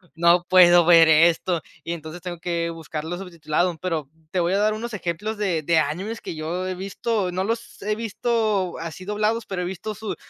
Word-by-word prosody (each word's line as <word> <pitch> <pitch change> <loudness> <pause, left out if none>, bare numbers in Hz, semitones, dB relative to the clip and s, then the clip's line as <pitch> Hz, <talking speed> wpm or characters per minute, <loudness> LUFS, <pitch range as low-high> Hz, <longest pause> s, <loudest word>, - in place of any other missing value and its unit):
"No 170 +1 +4
puedo 175 -2 +7
ver 165 -1 +7
esto", 165 +2 +4 0.2
y 165 - -4
entonces 165 +1 -7
tengo 175 -1 -6
que 170 -1 -2
buscarlo 165 0 -5
subtitulado, 170 -1 -2
pero 160 -6 -3 0.2
te 185 - 0
voy 175 +2 +1
a - - +3
dar 215 +1 +2
unos 230 +1 -5
ejemplos 205 +4 -3
de 180 -7 -1
de 165 +1 +3
animes 185 +10 -2
que - - -6
yo 165 +4 -3
he 185 - -3
visto. 195 +2 -2
No 185 +1 -1
los 230 +3 -4
he 210 +1 -1
visto 220 -3 -1
así 165 +2 -7
doblados, 215 +3 -1
pero 185 -2 -3
he - - -3
visto 190 +4 -5
su 220 0 -5
180 Hz, 200 wpm, -23 LUFS, 165-210 Hz, 0.2 s, puedo